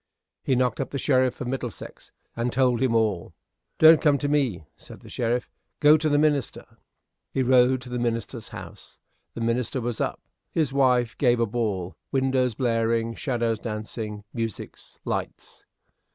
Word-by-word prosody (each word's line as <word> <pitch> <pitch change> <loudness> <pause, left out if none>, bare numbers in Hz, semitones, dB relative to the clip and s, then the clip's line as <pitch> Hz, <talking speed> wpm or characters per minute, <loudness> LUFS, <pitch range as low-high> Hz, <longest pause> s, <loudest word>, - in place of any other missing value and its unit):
He 130 - +1
knocked 125 -2 +1
up 135 - -2
the 140 - -4
sheriff 130 -2 +1
of 125 - -3
Middlesex, 125 -2 -6 0.2
and 120 +1 -1
told 125 -2 +2
him 130 -3 +2
all. 105 -6 0 0.4
"Don't 160 0 +7
come 145 -3 +4
to 145 - -2
me," 135 - 0
said - - -14
the - - -13
sheriff; 120 0 -1 0.3
"go 150 +1 +7
to 155 0 +1
the 145 - +3
minister." 145 -4 0 0.7
He 130 - 0
rode 130 0 +4
to 125 - -10
the 125 0 -3
minister's 115 0 -3
house. - - -11 0.4
The 115 - -5
minister 115 +2 -1
was 120 -1 -3
up. - - -2 0.3
His 150 -5 0
wife 125 -3 +2
gave 120 -3 +3
a 115 - +3
ball 100 -5 -2 0.2
windows 130 -3 +1
blaring, 115 -1 0
shadows 115 -4 -1
dancing 110 -1 -5
musics 115 -3 -6
lights. - - -5
125 Hz, 160 wpm, -25 LUFS, 115-135 Hz, 0.7 s, Don't